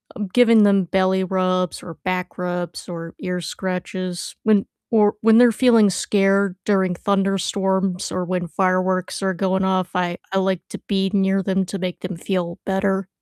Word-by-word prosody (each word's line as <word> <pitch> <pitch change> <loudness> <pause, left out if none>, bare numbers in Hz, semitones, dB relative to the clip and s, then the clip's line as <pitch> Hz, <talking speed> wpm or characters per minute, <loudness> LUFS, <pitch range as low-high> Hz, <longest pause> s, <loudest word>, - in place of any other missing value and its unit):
um, 205 -3 -4
giving 230 -3 +6
them 200 -2 +4
belly 190 +1 +1
rubs, 185 -1 -1
or 165 -3 -9
back 180 -1 -2
rubs, 180 -1 -4
or 165 -1 -7
ear 180 -1 -3
scratches 185 +1 -5
when 210 -2 +3 0.3
or 210 -2 +4
when 225 0 +5
they're 245 -1 +7
feeling 230 -3 +4
scared 195 0 +1
during 190 -3 +1
thunderstorms 195 -1 0
or 185 - -1
when 180 0 -2
fireworks 185 +1 0
are 190 -1 0
going 190 +1 0
off, 185 -1 0
I 175 -1 -1
I 195 - 0
like 190 -2 0
to - - -7
be 195 -1 0
near 195 -1 +2
them 190 0 0
to 195 - -5
make 180 -1 -4
them 185 -1 -5
feel 170 -1 -3
better. 195 0 0
190 Hz, 170 wpm, -21 LUFS, 180-195 Hz, 0.3 s, they're